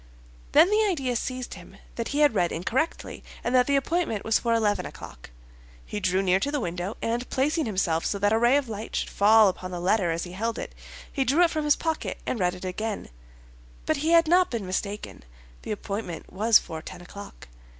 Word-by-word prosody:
Then 325 Hz, +6 st, +6 dB
the 430 Hz, +1 st, +4 dB
idea 270 Hz, -9 st, -1 dB
seized 255 Hz, +2 st, -4 dB
him -, -, -13 dB, 0.2 s
that 230 Hz, -, -4 dB
he 290 Hz, +1 st, -1 dB
had 295 Hz, -5 st, +5 dB
read 175 Hz, -4 st, +1 dB
incorrectly, 250 Hz, -, -2 dB, 0.2 s
and 240 Hz, -, -1 dB
that 250 Hz, -1 st, +4 dB
the 280 Hz, -, +2 dB
appointment 275 Hz, -, 0 dB
was 220 Hz, 0 st, +3 dB
for 235 Hz, -, -1 dB
eleven 220 Hz, -3 st, +2 dB
o'clock. -, -, -10 dB, 0.6 s
He 210 Hz, -, -4 dB
drew 185 Hz, 0 st, +1 dB
near 185 Hz, 0 st, +3 dB
to 280 Hz, -, -1 dB
the 295 Hz, -, -1 dB
window, 180 Hz, 0 st, -4 dB
and 235 Hz, +2 st, -2 dB
placing 300 Hz, +2 st, 0 dB
himself 180 Hz, -5 st, 0 dB
so 200 Hz, -, -1 dB
that 205 Hz, +2 st, +2 dB
a 220 Hz, -, +3 dB
ray 240 Hz, +4 st, +4 dB
of 285 Hz, -3 st, -1 dB
light 215 Hz, 0 st, -6 dB
should -, -, -2 dB
fall 215 Hz, +1 st, +6 dB
upon 185 Hz, -1 st, -3 dB
the 180 Hz, -1 st, -5 dB
letter 185 Hz, 0 st, +2 dB
as 165 Hz, +1 st, -1 dB
he 175 Hz, -, -7 dB
held 225 Hz, +5 st, -3 dB
it, -, -, -6 dB, 0.4 s
he 270 Hz, -, +1 dB
drew 280 Hz, +7 st, +3 dB
it 335 Hz, -, +3 dB
from 310 Hz, -2 st, -2 dB
his 295 Hz, -, +5 dB
pocket 320 Hz, -1 st, -3 dB
and 240 Hz, -, -2 dB
read 180 Hz, -1 st, +1 dB
it 180 Hz, -, -9 dB
again; 210 Hz, +3 st, -4 dB, 0.8 s
but 315 Hz, -, +1 dB
he 305 Hz, +3 st, -1 dB
had 335 Hz, -1 st, +5 dB
not 360 Hz, +2 st, +4 dB
been 230 Hz, -5 st, -3 dB
mistaken, 200 Hz, +3 st, -4 dB, 0.4 s
the -, -, -9 dB
appointment 200 Hz, -4 st, -5 dB
was 220 Hz, +3 st, +5 dB
for 160 Hz, -2 st, -6 dB
ten 175 Hz, -, -10 dB
o'clock. 200 Hz, +3 st, -11 dB
225 Hz, 215 wpm, -26 LUFS, 190-280 Hz, 0.8 s, Then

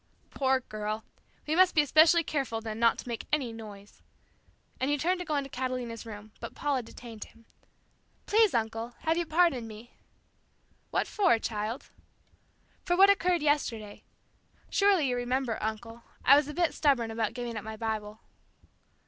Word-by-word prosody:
"Poor 265 Hz, -1 st, +1 dB
girl! 215 Hz, -1 st, -4 dB, 0.4 s
We 305 Hz, -, 0 dB
must 370 Hz, 0 st, +5 dB
be 300 Hz, -, +5 dB
especially 315 Hz, +3 st, +5 dB
careful 270 Hz, -7 st, -2 dB
then 220 Hz, -1 st, -6 dB
not 230 Hz, 0 st, +4 dB
to -, -, -8 dB
make 235 Hz, -2 st, -5 dB
any 265 Hz, -6 st, 0 dB
noise," 205 Hz, -3 st, -11 dB, 0.8 s
and 260 Hz, -, 0 dB
he 290 Hz, -, +2 dB
turned 360 Hz, +5 st, 0 dB
to 360 Hz, -, -5 dB
go 305 Hz, -, 0 dB
into 280 Hz, -1 st, -1 dB
Catalina's 250 Hz, -3 st, -4 dB
room, 210 Hz, 0 st, -9 dB
but 235 Hz, -, -8 dB
Paula 285 Hz, -3 st, 0 dB
detained 230 Hz, -1 st, -10 dB
him. 230 Hz, 0 st, -21 dB, 0.8 s
"Please, 435 Hz, -, +4 dB
uncle, 225 Hz, +1 st, -2 dB
have 320 Hz, +1 st, +1 dB
you 340 Hz, -1 st, -1 dB
pardoned 310 Hz, -8 st, +2 dB
me?" 220 Hz, +2 st, -12 dB, 1.0 s
"What -, -, 0 dB
for, 375 Hz, -, +3 dB
child?" 220 Hz, +2 st, -4 dB, 0.9 s
"For 350 Hz, 0 st, 0 dB
what 395 Hz, +1 st, +8 dB
occurred 360 Hz, -4 st, +1 dB
yesterday. 230 Hz, -8 st, -1 dB, 0.7 s
Surely 395 Hz, -7 st, +3 dB
you 250 Hz, -, 0 dB
remember, 245 Hz, -1 st, -1 dB
uncle. 225 Hz, +2 st, -5 dB, 0.2 s
I 275 Hz, -, +9 dB
was 290 Hz, 0 st, +3 dB
a 300 Hz, -, -6 dB
bit 345 Hz, -1 st, +1 dB
stubborn 250 Hz, -7 st, +2 dB
about 225 Hz, 0 st, -2 dB
giving 240 Hz, -2 st, -4 dB
up 215 Hz, -, -5 dB
my 220 Hz, 0 st, -7 dB
Bible." 215 Hz, -1 st, -4 dB
245 Hz, 165 wpm, -29 LUFS, 225-300 Hz, 1.0 s, I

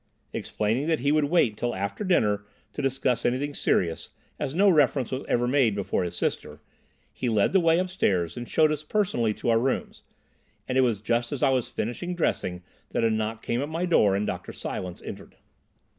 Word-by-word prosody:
Explaining 115 Hz, +8 st, -1 dB
that 160 Hz, -4 st, +1 dB
he 140 Hz, +2 st, +2 dB
would 155 Hz, -1 st, +3 dB
wait 145 Hz, -8 st, +2 dB
till 120 Hz, +2 st, -2 dB
after 100 Hz, -, -3 dB
dinner 105 Hz, -, +2 dB, 0.3 s
to -, -, -4 dB
discuss 135 Hz, -2 st, 0 dB
anything 140 Hz, +4 st, 0 dB
serious, 85 Hz, -10 st, 0 dB, 0.3 s
as 135 Hz, -, -3 dB
no 200 Hz, +3 st, +4 dB
reference 145 Hz, -, +3 dB
was 130 Hz, +1 st, -3 dB
ever 120 Hz, 0 st, +2 dB
made 125 Hz, -5 st, +3 dB
before 100 Hz, -2 st, -1 dB
his 90 Hz, -, -4 dB
sister, -, -, -2 dB, 0.5 s
he 125 Hz, -, -2 dB
led 105 Hz, -3 st, +2 dB
the 190 Hz, -, +4 dB
way 165 Hz, -1 st, +4 dB
upstairs 100 Hz, -, 0 dB
and 120 Hz, 0 st, -7 dB
showed 155 Hz, -1 st, +4 dB
us 150 Hz, -1 st, -2 dB
personally 155 Hz, -, 0 dB
to 105 Hz, -, -3 dB
our 115 Hz, -, +4 dB
rooms; 130 Hz, +2 st, -2 dB, 0.7 s
and 130 Hz, -, -2 dB
it 130 Hz, -, +5 dB
was 115 Hz, -6 st, +1 dB
just 120 Hz, +2 st, 0 dB
as 145 Hz, -, -2 dB
I -, -, +5 dB
was 130 Hz, -3 st, 0 dB
finishing 175 Hz, +11 st, -3 dB
dressing 90 Hz, -, -1 dB, 0.3 s
that -, -, -1 dB
a 115 Hz, -, +3 dB
knock 110 Hz, +1 st, -2 dB
came 120 Hz, +2 st, -1 dB
at 145 Hz, -, -3 dB
my 165 Hz, +3 st, -1 dB
door 105 Hz, -, +4 dB
and 100 Hz, +1 st, 0 dB
Dr. -, -, -5 dB
Silence 90 Hz, -1 st, -6 dB
entered. -, -, -9 dB
125 Hz, 200 wpm, -26 LUFS, 110-150 Hz, 0.7 s, it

